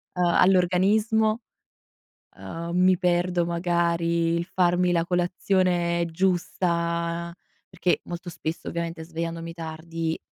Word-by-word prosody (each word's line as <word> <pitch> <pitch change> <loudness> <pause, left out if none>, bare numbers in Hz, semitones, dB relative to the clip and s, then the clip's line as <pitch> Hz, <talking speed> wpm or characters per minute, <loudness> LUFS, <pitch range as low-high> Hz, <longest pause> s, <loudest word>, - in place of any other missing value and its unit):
uhm, 180 - +2
all'organismo, 195 +6 +3 1.0
uhm, 170 +1 -6
mi 185 0 +4
perdo 175 -1 +1
magari 170 -1 +1
il 170 - -1
farmi 180 0 +2
la 170 -1 +2
colazione 175 -1 +1
giusta 170 -1 -1 0.4
perché 180 -1 0
molto 175 +1 -7
spesso, 165 -1 -5
ovviamente 170 -1 -4
svegliandomi 165 0 -5
tardi, 165 0 -4
170 Hz, 100 wpm, -25 LUFS, 170-180 Hz, 1.0 s, mi